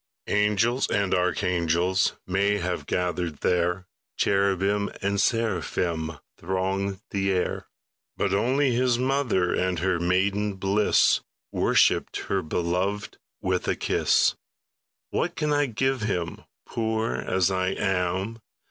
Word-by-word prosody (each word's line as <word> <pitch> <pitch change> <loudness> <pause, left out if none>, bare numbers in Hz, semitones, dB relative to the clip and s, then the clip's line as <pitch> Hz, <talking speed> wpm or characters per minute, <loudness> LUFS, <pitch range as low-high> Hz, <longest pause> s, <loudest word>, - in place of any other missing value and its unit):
Angels 105 +5 +2
and 100 -1 +1
archangels 90 0 +1
May 100 +2 +1
have 90 -2 -3
gathered 90 -4 -2
there, 90 +1 +1 0.3
Cherubim 100 +1 +1
and 100 0 +1
seraphim 90 - -1 0.2
Thronged 95 +2 -2
the 95 -1 0
air; 90 -1 -1 0.5
But 100 - 0
only 130 +7 +2
His 120 0 +2
mother, 125 -8 +1
In 90 -1 0
her 90 +1 0
maiden 100 +4 +1
bliss, 100 +2 +3 0.3
Worshipped - - +2
the 95 -1 +1
Beloved 90 +5 -2 0.2
With - - 0
a - - +1
kiss. - - +2 0.8
What 175 +1 -1
can 150 -1 0
I 145 -1 +2
give 130 +2 0
Him, 90 -6 -3 0.2
Poor 110 - -1
as 90 +8 +1
I 95 -1 0
am? 95 +3 -1
95 Hz, 115 wpm, -26 LUFS, 90-105 Hz, 0.8 s, bliss